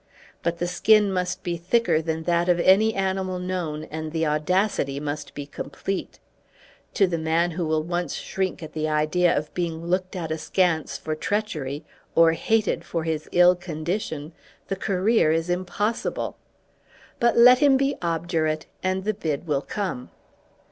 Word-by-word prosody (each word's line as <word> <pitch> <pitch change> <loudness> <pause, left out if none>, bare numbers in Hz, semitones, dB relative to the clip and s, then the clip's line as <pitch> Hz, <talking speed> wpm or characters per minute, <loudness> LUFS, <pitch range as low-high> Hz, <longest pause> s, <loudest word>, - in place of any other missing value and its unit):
But 170 0 -1
the 175 - -1
skin 205 +2 +4
must 180 -1 -2
be 175 -1 -2
thicker 170 -2 +2
than 160 0 -3
that 175 +1 +1
of 175 -1 +3
any 210 +5 +4
animal 190 -1 -1
known, 180 -4 -3
and 155 0 -4
the 160 0 0
audacity 150 -2 0
must 145 0 -5
be 145 - -5
complete. 190 +6 -5 0.8
To 200 - +5
the 170 -3 -2
man 165 +2 +1
who 170 0 -2
will 155 0 +1
once 175 -1 -2
shrink 190 -2 -3
at 155 - -9
the 155 0 -1
idea 155 +3 +2
of 150 +1 -4
being 170 -2 -3
looked 185 +2 -1
at 165 -3 -4
askance 160 0 0
for 155 - -4
treachery, 155 -6 -3 0.3
or 165 0 +6
hated 220 +6 0
for 165 -1 -3
his 160 -1 -3
ill 175 0 +6
condition, 160 -2 -4 0.4
the 195 - 0
career 195 -2 +2
is 165 +2 0
impossible. 185 +5 -2 0.8
But 235 0 +3
let 250 +1 +8
him 280 -2 +5
be 275 +1 +1
obdurate, 165 -2 -1 0.2
and 185 0 -1
the 215 +2 0
bid 160 -6 -3
will 145 -4 0
come. 180 -8 -4
175 Hz, 160 wpm, -24 LUFS, 155-190 Hz, 0.8 s, let